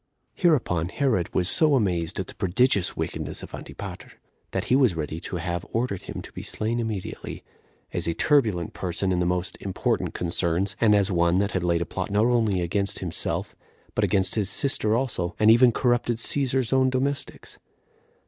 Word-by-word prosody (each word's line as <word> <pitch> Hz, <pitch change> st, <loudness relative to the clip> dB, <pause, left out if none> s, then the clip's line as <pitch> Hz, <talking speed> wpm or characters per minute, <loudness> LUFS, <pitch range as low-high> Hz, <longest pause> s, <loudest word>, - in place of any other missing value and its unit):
8. -, -, -18 dB
Hereupon 115 Hz, -, +2 dB
Herod 110 Hz, -, 0 dB
was 90 Hz, -, +1 dB
so 150 Hz, -, +4 dB
amazed 90 Hz, -9 st, 0 dB
at -, -, -2 dB
the -, -, -11 dB
prodigious 100 Hz, +1 st, +2 dB
wickedness -, -, -3 dB
of -, -, -10 dB
Antipater, -, -, -8 dB, 0.4 s
that -, -, -2 dB
he 125 Hz, -, +2 dB
was 130 Hz, -9 st, +3 dB
ready 80 Hz, 0 st, -4 dB
to 90 Hz, -, -6 dB
have 85 Hz, 0 st, -3 dB
ordered 115 Hz, -5 st, -1 dB
him -, -, -7 dB
to -, -, -11 dB
be -, -, -7 dB
slain 115 Hz, +2 st, -2 dB
immediately, 110 Hz, -5 st, -5 dB, 0.5 s
as -, -, -2 dB
a 85 Hz, -, -1 dB
turbulent 110 Hz, -, +2 dB
person 95 Hz, +1 st, -2 dB
in 90 Hz, -, +1 dB
the 90 Hz, -, +1 dB
most 90 Hz, +1 st, -2 dB
important 95 Hz, -2 st, -1 dB
concerns, 85 Hz, +2 st, 0 dB
and 105 Hz, -2 st, +5 dB
as 100 Hz, 0 st, +2 dB
one 85 Hz, 0 st, +2 dB
that 100 Hz, +1 st, +1 dB
had 95 Hz, -, -1 dB
laid 85 Hz, -1 st, +1 dB
a -, -, -8 dB
plot 95 Hz, +4 st, -4 dB
not 105 Hz, +2 st, +2 dB
only 115 Hz, -6 st, +2 dB
against 100 Hz, +3 st, -1 dB
himself, 85 Hz, -3 st, -1 dB, 0.4 s
but -, -, 0 dB
against 95 Hz, -2 st, +2 dB
his 105 Hz, -3 st, +1 dB
sister 110 Hz, -2 st, +1 dB
also, 115 Hz, -9 st, -2 dB
and 110 Hz, +1 st, +6 dB
even 120 Hz, +1 st, +6 dB
corrupted 120 Hz, -1 st, +1 dB
Cæsar's 130 Hz, 0 st, +1 dB
own 130 Hz, 0 st, +4 dB
domestics. 135 Hz, +2 st, -3 dB
100 Hz, 185 wpm, -25 LUFS, 90-120 Hz, 0.5 s, and